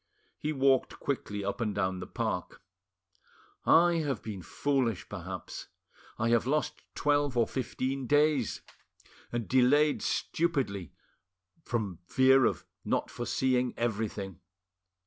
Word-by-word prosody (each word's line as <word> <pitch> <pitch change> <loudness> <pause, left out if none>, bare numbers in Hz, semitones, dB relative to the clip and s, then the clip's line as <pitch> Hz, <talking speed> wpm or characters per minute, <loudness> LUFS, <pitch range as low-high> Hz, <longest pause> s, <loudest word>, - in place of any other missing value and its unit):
He 155 - -1
walked 135 -2 +2
quickly 105 -7 -3
up 100 +4 -3
and 105 -3 -1
down 95 -2 0
the - - -6
park— - - -3 1.0
"I 170 +1 +6
have 145 -7 -2
been 105 -4 -5
foolish, 125 - -1
perhaps; - - -7 0.5
I 115 +1 +1
have 120 0 +3
lost 150 +2 0
twelve 145 -3 +1
or 115 - +4
fifteen 130 +2 -3
days, 145 -4 +2 0.7
and 120 -2 -2
delayed 145 +4 +4
stupidly 135 - -1 0.7
from 105 - -3
fear 130 +1 +5
of - - 0 0.2
not - - -1
foreseeing 125 -1 0
everything. 105 -5 -2
125 Hz, 115 wpm, -30 LUFS, 110-145 Hz, 1.0 s, I